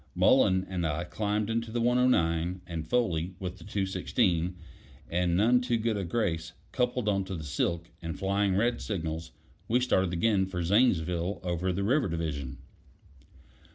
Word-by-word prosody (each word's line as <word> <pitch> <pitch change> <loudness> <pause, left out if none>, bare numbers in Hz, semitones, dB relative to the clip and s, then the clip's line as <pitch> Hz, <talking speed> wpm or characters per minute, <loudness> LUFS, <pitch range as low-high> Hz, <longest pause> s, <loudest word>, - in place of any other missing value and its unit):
Mullen 95 0 +4
and 90 -2 -3
I 80 +1 -1
climbed 105 +3 -1
into 115 0 -1
the 120 - -1
109, 90 -8 +2
and 85 -3 -5
Foley, 90 -7 0
with 90 -1 -6
the - - -12
216, 95 -2 0 0.6
and 85 0 +1
none 120 +5 +4
too 120 -2 0
good 115 0 0
a 100 - -2
grace, 85 -4 -1 0.2
coupled 125 -2 0
on 100 -2 +2
to 95 0 -5
the 80 - -6
silk, 85 +4 -2
and 80 -2 -5
flying 100 0 +1
red 120 +5 +1
signals, 80 - -3 0.4
we 120 +3 +3
started 95 -8 +2
again 95 +2 +2
for 90 -2 -3
Zanesville 90 -3 +2
over 90 +1 -1
the 95 +2 -2
river 130 +5 +2
division. 70 -5 -3
95 Hz, 155 wpm, -29 LUFS, 85-110 Hz, 0.6 s, Mullen